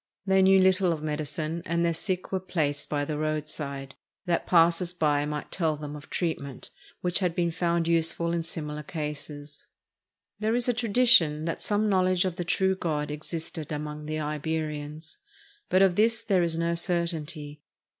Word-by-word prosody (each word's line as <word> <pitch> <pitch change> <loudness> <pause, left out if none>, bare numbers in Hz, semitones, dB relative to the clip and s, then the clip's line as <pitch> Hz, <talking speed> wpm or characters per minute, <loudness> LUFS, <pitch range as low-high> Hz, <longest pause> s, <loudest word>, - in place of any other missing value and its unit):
They 190 -1 +4
knew 190 0 +6
little 185 -1 +4
of 155 -2 -3
medicine, 155 +2 -3
and 170 -1 0
their 170 - +2
sick 185 +2 -2
were 190 - 0
placed 155 -6 -2
by 145 -1 0
the 150 0 -3
roadside, 150 -3 -3 0.3
that 175 -2 0
passers 170 +1 +4
by 150 -4 +2
might 150 0 -5
tell 160 -4 0
them 150 0 -6
of 145 - -11
treatment 140 -6 -3 0.3
which 180 +1 +1
had 180 -3 0
been 170 -1 +1
found 170 -1 0
useful 170 0 +1
in 170 - 0
similar 150 -2 -5
cases. 150 -1 -6 0.7
There 215 +2 +1
is 245 0 +2
a 245 - +3
tradition 225 -9 +4
that 165 - -3
some 210 +1 +1
knowledge 185 -2 +3
of 185 -2 -2
the 175 - -1
true 190 +2 +1
God 150 -5 -2
existed 155 0 -5
among 150 0 -5
the 155 0 -2
Iberians; 150 - -4 0.5
but 185 +1 +5
of 185 -2 +4
this 230 +2 +2
there 190 -5 +2
is 165 -1 +1
no 170 0 +1
certainty. 165 -4 -2
165 Hz, 170 wpm, -27 LUFS, 150-185 Hz, 0.7 s, knew